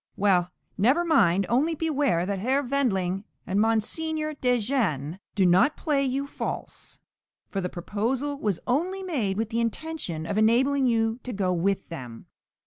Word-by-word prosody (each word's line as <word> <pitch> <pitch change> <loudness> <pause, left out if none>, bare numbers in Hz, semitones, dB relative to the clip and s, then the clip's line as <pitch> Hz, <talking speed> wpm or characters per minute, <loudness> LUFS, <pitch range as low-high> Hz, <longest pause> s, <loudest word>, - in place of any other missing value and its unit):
Well, 185 -3 +2 0.3
never 265 - +3
mind, 200 - +4
only 295 +7 +2
beware 285 - +1
that 195 0 -2
Herr 265 +7 +1
Wendling 195 -9 0 0.2
and 195 +2 +1
Mons. 225 -1 +1
de 310 -5 -1
Jean 190 - -1 0.2
do 195 -3 +3
not 185 - +4
play 290 -3 +1
you 270 +1 -1
false, 280 - -6 0.5
for 195 - -2
the 180 - -2
proposal 240 +11 -2
was 205 -8 -1
only 355 +10 0
made 235 - -1
with 220 0 -1
the 230 0 -1
intention 230 - -3
of 200 +5 -1
enabling 260 +5 +3
you 225 0 +1
to 250 - -6
go 190 -3 0
with 190 +3 0
them. 125 -9 -8
225 Hz, 155 wpm, -26 LUFS, 190-280 Hz, 0.5 s, mind